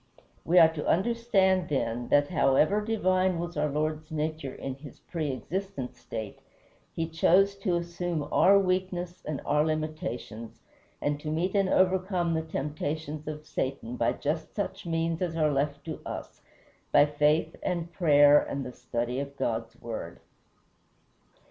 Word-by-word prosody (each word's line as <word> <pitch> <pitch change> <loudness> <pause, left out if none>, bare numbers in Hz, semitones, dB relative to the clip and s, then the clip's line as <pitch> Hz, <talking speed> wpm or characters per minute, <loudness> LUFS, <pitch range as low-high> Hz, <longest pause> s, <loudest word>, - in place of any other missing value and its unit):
We 175 +2 +2
are 160 -2 +8
to 150 - -4
understand, 190 -3 +2
then, 120 -4 -1
that 145 0 +4
however 155 +5 +3
divine 185 -4 +1
was 175 +1 -4
our 150 0 +1
Lord's 155 +1 -2
nature 155 -3 -3
in 135 - -5
his 140 +2 -12
preëxistent 155 -1 -4
state, 110 -2 -7 0.6
he 165 - -1
chose 185 +5 +4
to 195 -3 0
assume 170 -2 -2
our 200 +2 +6
weakness 185 -2 -1
and 150 -2 -2
our 150 +1 +3
limitations, 155 -8 -4 0.4
and 145 0 0
to 150 - -5
meet 170 +5 0
and 195 -2 +2
overcome 185 -2 +2
the 160 - 0
temptations 150 0 -4
of 155 0 -6
Satan 130 -4 -3
by 115 - +1
just 155 +2 -3
such 200 -3 -4
means 165 0 -1
as 170 -2 -1
are 155 -2 +3
left 145 +1 -1
to 160 - -6
us - - -7 0.5
by - - +7
faith 150 +2 +1
and 170 -2 -3
prayer 145 -4 +6
and 140 -1 -4
the 125 - -7
study 125 0 -3
of 140 0 -6
God's 115 0 -2
Word. 110 -7 -6
155 Hz, 150 wpm, -28 LUFS, 145-180 Hz, 0.6 s, are